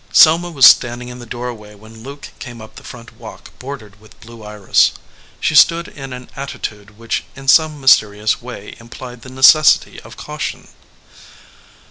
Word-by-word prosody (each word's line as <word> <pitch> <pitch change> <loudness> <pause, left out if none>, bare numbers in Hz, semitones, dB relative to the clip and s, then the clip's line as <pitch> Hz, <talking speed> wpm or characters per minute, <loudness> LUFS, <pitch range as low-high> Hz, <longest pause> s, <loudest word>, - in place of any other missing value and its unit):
Selma 170 +2 +5
was 140 -6 +4
standing 120 0 +4
in 125 0 -10
the 120 - -12
doorway 115 -3 -8
when 110 +2 -16
Luke 140 +4 -11
came 120 -3 -10
up 110 0 -13
the - - -13
front 120 -1 -12
walk - - -12
bordered 110 -7 -10
with 110 - -20
blue 115 0 -14
iris. 105 -2 +1 0.5
She - - -1
stood 170 +1 +4
in 135 -2 -10
an 125 0 -10
attitude 105 -6 -8
which 115 0 -4
in 135 0 -12
some 155 +1 +3
mysterious 105 -5 +2
way 120 -4 -10
implied 120 +1 -11
the 130 - -12
necessity 135 +4 +4
of - - -15
caution. - - -7
120 Hz, 160 wpm, -16 LUFS, 110-135 Hz, 0.5 s, Selma